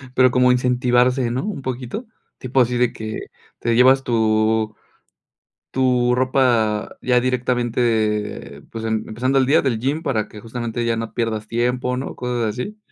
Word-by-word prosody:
pero, 130 Hz, -1 st, +5 dB
como 125 Hz, 0 st, +4 dB
incentivarse, 125 Hz, 0 st, +2 dB
¿no? 130 Hz, +6 st, -2 dB
Un 200 Hz, -10 st, -4 dB
poquito. 130 Hz, -, -5 dB, 0.3 s
Tipo 130 Hz, +1 st, +1 dB
así 125 Hz, 0 st, +1 dB
de 120 Hz, -1 st, +2 dB
que 110 Hz, 0 st, -5 dB, 0.4 s
te 115 Hz, 0 st, 0 dB
llevas 130 Hz, +2 st, +5 dB
tu 110 Hz, -2 st, +1 dB, 1.0 s
tu 125 Hz, -2 st, +2 dB
ropa 125 Hz, -5 st, +1 dB
ya 125 Hz, -1 st, +3 dB
directamente, 115 Hz, -, -1 dB
pues, 115 Hz, 0 st, -5 dB
em 110 Hz, -1 st, -1 dB
empezando 130 Hz, +5 st, 0 dB
el 130 Hz, -, +3 dB
día 150 Hz, +5 st, +4 dB
del 130 Hz, -5 st, 0 dB
gym, 145 Hz, +6 st, -1 dB
para 110 Hz, -9 st, -1 dB
que 105 Hz, -, -11 dB
justamente 120 Hz, +1 st, -4 dB
ya 115 Hz, -, +1 dB
no 115 Hz, 0 st, -5 dB
pierdas 110 Hz, -2 st, -2 dB
tiempo, 125 Hz, +2 st, -1 dB
¿no? 130 Hz, -, -5 dB
Cosas 125 Hz, -2 st, -2 dB
así. 200 Hz, -, -5 dB
125 Hz, 160 wpm, -21 LUFS, 115-130 Hz, 1.0 s, pero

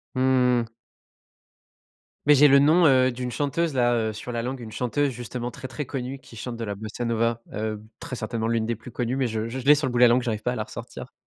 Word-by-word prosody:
Mmh 130 Hz, -2 st, +3 dB
mh. 115 Hz, 0 st, -9 dB, 1.5 s
Mais, 150 Hz, 0 st, +7 dB
j'ai 145 Hz, +2 st, +7 dB
le 140 Hz, 0 st, +6 dB
nom, 160 Hz, +5 st, +5 dB
heu, 130 Hz, -1 st, +4 dB
d'une 125 Hz, 0 st, -4 dB
chanteuse, 150 Hz, +2 st, -1 dB
là, 120 Hz, -2 st, +2 dB, 0.2 s
heu, -, -, -5 dB
sur 110 Hz, +3 st, -7 dB
la 120 Hz, -1 st, -2 dB
langue, 125 Hz, +1 st, -4 dB
une 110 Hz, -2 st, -8 dB
chanteuse, 140 Hz, +5 st, 0 dB
justement, 120 Hz, 0 st, -5 dB
très, 130 Hz, 0 st, -8 dB
très 145 Hz, +2 st, -5 dB
connue, 130 Hz, 0 st, -5 dB
qui 125 Hz, -3 st, -15 dB
chante 125 Hz, 0 st, -5 dB
de 115 Hz, -, -5 dB
la 105 Hz, -2 st, -3 dB
bossa 110 Hz, +4 st, -6 dB
nova, 115 Hz, 0 st, 0 dB
heu, 110 Hz, 0 st, -3 dB, 0.2 s
très 125 Hz, -, -6 dB
certainement 115 Hz, -1 st, -3 dB
l'une 115 Hz, -1 st, 0 dB
des 115 Hz, +1 st, -1 dB
plus 115 Hz, +3 st, -12 dB
connues 120 Hz, +1 st, -2 dB
mais 135 Hz, -2 st, +1 dB
je 110 Hz, 0 st, -3 dB
je 130 Hz, +3 st, -4 dB
je 125 Hz, -, -8 dB
l'ai 150 Hz, +1 st, +8 dB
sur 145 Hz, -2 st, -1 dB
le -, -, -2 dB
bout 120 Hz, -, -1 dB
de 125 Hz, -, +6 dB
la -, -, +9 dB
langue, 120 Hz, +2 st, +4 dB
j'arrive 110 Hz, -3 st, -2 dB
pas 125 Hz, +2 st, -1 dB
à -, -, -4 dB
la -, -, -2 dB
ressortir, -, -, -9 dB
125 Hz, 260 wpm, -25 LUFS, 115-130 Hz, 1.5 s, la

